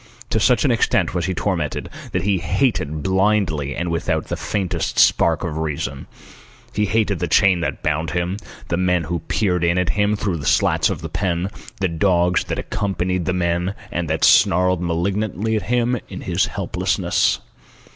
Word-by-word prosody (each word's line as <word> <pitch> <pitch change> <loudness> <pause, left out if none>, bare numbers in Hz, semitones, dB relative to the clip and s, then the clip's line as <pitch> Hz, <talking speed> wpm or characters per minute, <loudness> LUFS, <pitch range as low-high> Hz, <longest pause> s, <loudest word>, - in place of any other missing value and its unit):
To - - +2
such - - +3
an - - +3
extent - - +1
was 90 -1 -1
he 95 - -2
tormented, 85 -7 -2 0.2
that 90 - -1
he 100 -2 +1
hated 80 - 0
blindly 95 -7 +1
and 85 0 -2
without 85 - -1
the - - -1
faintest 95 -4 -2
spark 85 +1 +4
of 80 -3 -3
reason. 70 -3 -3 0.7
He 105 0 +1
hated 105 -3 +1
the 90 - -1
chain 95 +2 +4
that 85 - -3
bound 80 +1 0
him, 90 +2 -2 0.3
the 85 - 0
men 90 -1 +1
who 85 +2 -2
peered 90 +2 0
in 85 +1 +2
at 90 -1 +1
him 105 +1 +1
through 100 -4 -2
the 70 -3 -5
slats - - +3
of - - -4
the - - -4
pen, 90 0 -1 0.3
the 95 - +3
dogs 90 +1 +2
that - - -3
accompanied 90 -4 -2
the 90 - 0
men 90 +2 0 0.2
and 85 -2 -2
that 80 - -1
snarled 90 0 +4
malignantly 100 +5 -1
at 105 - 0
him 120 0 +1
in - - -7
his - - 0
helplessness. - - 0
90 Hz, 175 wpm, -21 LUFS, 85-100 Hz, 0.7 s, spark